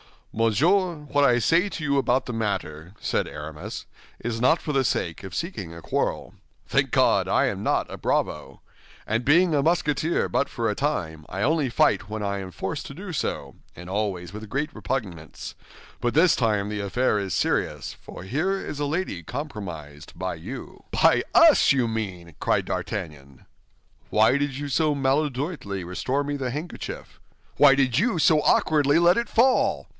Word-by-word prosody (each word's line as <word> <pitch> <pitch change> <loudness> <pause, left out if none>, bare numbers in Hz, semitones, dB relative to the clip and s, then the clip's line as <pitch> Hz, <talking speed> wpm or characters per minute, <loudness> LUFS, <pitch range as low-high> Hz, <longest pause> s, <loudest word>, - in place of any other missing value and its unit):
"Monsieur, 165 - +2 0.2
what 145 0 +4
I 120 -2 +4
say 165 - +3
to 165 - -6
you 140 -1 +1
about 130 -1 +2
the - - -5
matter," 95 -7 -3
said - - 0
Aramis, 75 0 -7 0.3
"is 115 0 -3
not 160 +7 +4
for 150 - -3
the 135 -2 +1
sake 85 -5 -2
of 95 -2 -7
seeking 105 - -4
a 85 - -10
quarrel. - - -2 0.3
Thank - - +1
God, - - +3
I - - +3
am - - -3
not - - +1
a - - -6
bravo! - - -2 0.4
And 115 +3 -1
being 170 +4 +4
a 145 - +3
Musketeer 160 0 +1
but 140 - +1
for 115 -3 -2
a - - 0
time, 85 - -2
I 95 - -5
only 150 -1 +2
fight 105 -2 +2
when 110 0 -4
I 100 0 -2
am 95 -1 -6
forced 145 - -5
to - - -8
do 190 +3 -7
so, 160 - -3 0.2
and 90 +1 -10
always 95 -4 -2
with 105 0 -8
great 145 +5 -2
repugnance; 95 -12 -5 0.5
but 120 - -1
this 165 +3 +5
time 105 -4 0
the 105 0 -3
affair 105 +2 +1
is 95 -2 -3
serious, - - -1
for - - -10
here 155 - 0
is 150 -6 -6
a 145 - 0
lady 150 - -2
compromised 85 - -7
by - - -3
you." - - -9
"By - - +4
us, - - +7
you 125 -4 +1
mean!" 90 -7 -5
cried - - +1
D'Artagnan. 70 -4 -5 0.6
"Why 110 +5 +4
did 140 -2 -2
you 145 +1 -4
so 150 +2 +2
maladroitly 135 - -1
restore 125 +11 -2
me 145 0 -3
the 130 -3 -3
handkerchief?" 155 +6 -7 0.4
"Why 140 -2 +7
did 130 -1 +2
you 225 -2 +1
so 155 0 +4
awkwardly 150 -1 +3
let 175 +2 +5
it 235 0 0
fall?" 255 +3 +2
130 Hz, 175 wpm, -25 LUFS, 100-150 Hz, 0.6 s, us